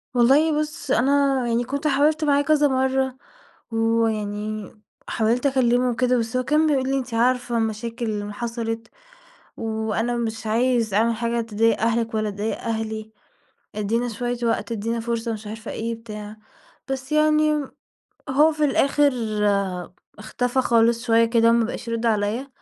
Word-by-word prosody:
والله 290 +6 +4
بُص 305 -2 -4
أنا 275 +2 +3
يعني 235 +1 +1
كنت 280 +5 -2
حاولت 300 +2 +2
معاه 285 -1 +3
كذا 295 0 +3
مرّة 265 -1 0 0.5
ويعني 215 -2 -1 0.4
حاولت 235 +4 0
أكلمه 250 -2 +2
وكده 250 +1 +1
بس 230 +2 -2
هو 255 - 0
كان 305 +4 +2
بيقول 265 -3 +1
لي: 275 - +1
"أنتِ 255 -3 -5
عارفة 245 +1 +1
المشاكل 230 +2 -2
اللي 205 -2 -3
حصلت 230 0 -4 0.7
وأنا 225 +1 -2
مش 225 -1 -3
عايز 230 -1 +1
أعمل 225 +3 +2
حاجة 235 +1 -1
تضايق 225 0 +1
أهلِك 230 0 0
ولا 215 -1 0
تضايق 205 +2 -3
أهلي، 220 -1 -4 0.6
ادينا 225 +4 -1
شوية 240 +2 -3
وقت، 225 -2 -1
ادينا 230 +1 -2
فرصة،" 230 0 -2
مش 215 -1 -8
عارفة 220 +1 -7
إيه 230 +1 -3
بتاع، 215 -2 -9 0.5
بس 265 +1 -4
يعني 305 -1 +3 0.6
هو 295 +4 +4
في 305 -1 0
الآخر 285 0 +3 1.1
اختفى 245 +4 -1
خالص 235 -1 +2
شوية 230 0 +4
كده 230 0 +3
ما 235 -1 +3
بقاش 230 - -6
يرد 230 0 -2
عليَّ 220 +4 0
235 Hz, 145 wpm, -23 LUFS, 225-265 Hz, 1.1 s, والله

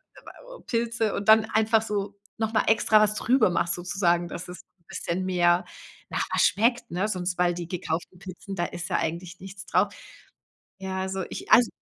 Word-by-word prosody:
äh, - - -13
Pilze 230 -2 -1
und 200 +1 -2
dann 220 0 +7
einfach 220 0 +2
so 205 -2 -3 0.2
noch 220 0 -2
mal 215 - +3
extra 220 0 +4
was 210 0 +2
drüber 250 0 +3
machst 170 -1 0
sozusagen, 175 -1 0
dass 170 +1 -7
es 180 - -9 0.3
bisschen 185 +2 -3
mehr 175 -1 +2 0.4
nach - - -1
was - - +2
schmeckt, 235 +1 +2
ne? 180 +4 -1
Sonst 180 -3 -3
weil, 175 -1 +2
die 175 -1 -6
gekauften 175 0 -4
Pizzen, 195 +1 -8
da 175 - -1
ist 175 -1 -6
ja - - +1
eigentlich 170 +2 -4
nichts 195 0 -10
drauf. - - +1 0.9
Ja, 190 0 -4
also, 190 0 -3
ich, - - -8
also 235 -1 +7
190 Hz, 185 wpm, -26 LUFS, 175-215 Hz, 0.9 s, dann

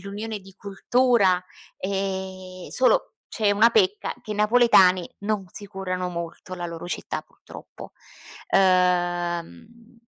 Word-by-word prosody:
l'unione 210 +3 -6
di 195 -1 -16
cultura, 200 -1 +2 0.3
ehm, 190 -1 -5
solo 475 - +1
c'è 215 -3 +1
una 215 +3 +5
pecca: 205 -3 +1
che 220 - -10
i 210 - -2
napoletani 210 -5 +4
non 205 -1 -2
si 205 - -8
curano 185 -2 -4
molto 170 +1 -7
la 175 -1 -5
loro 170 0 -7
città, 175 - -4
purtroppo. - - -13 0.6
Uhm, 180 - 0
195 Hz, 120 wpm, -24 LUFS, 180-210 Hz, 0.6 s, una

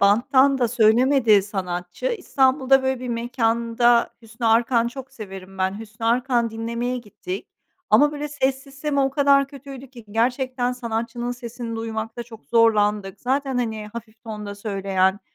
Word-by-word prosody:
banttan 260 +7 +4
da 245 -2 +2
söylemedi 230 -1 +4
sanatçı. 180 - -4
İstanbul'da, 270 - +2
böyle, 265 -1 -1
bir 255 - -5
mekânda, 235 0 +1
Hüsnü 225 +1 -5
Arkan 230 +1 +3
çok 265 +1 -9
severim 195 -5 -10
ben, 190 +2 0
Hüsnü 225 +1 -6
Arkan 240 0 +1
dinlemeye 235 +3 -3
gittik. 200 -4 -7 0.4
Ama, 295 0 +5
böyle, 295 0 -4
ses 270 -2 -1
sistemi 280 +1 -2
o 270 0 +2
kadar 280 0 +4
kötüydü 275 -2 -11
ki 240 -4 -13
gerçekten 250 +2 0
sanatçının 240 0 -3
sesini 240 -1 -6
duymakta 225 +1 -4
çok 225 -7 -14
zorlandık. 210 -1 +2
Zaten, 265 0 0
hani, 220 -3 -3
hafif 225 -1 -10
tonda 210 -2 -6
söyleyen, 195 -2 0
235 Hz, 140 wpm, -23 LUFS, 220-260 Hz, 0.4 s, Ama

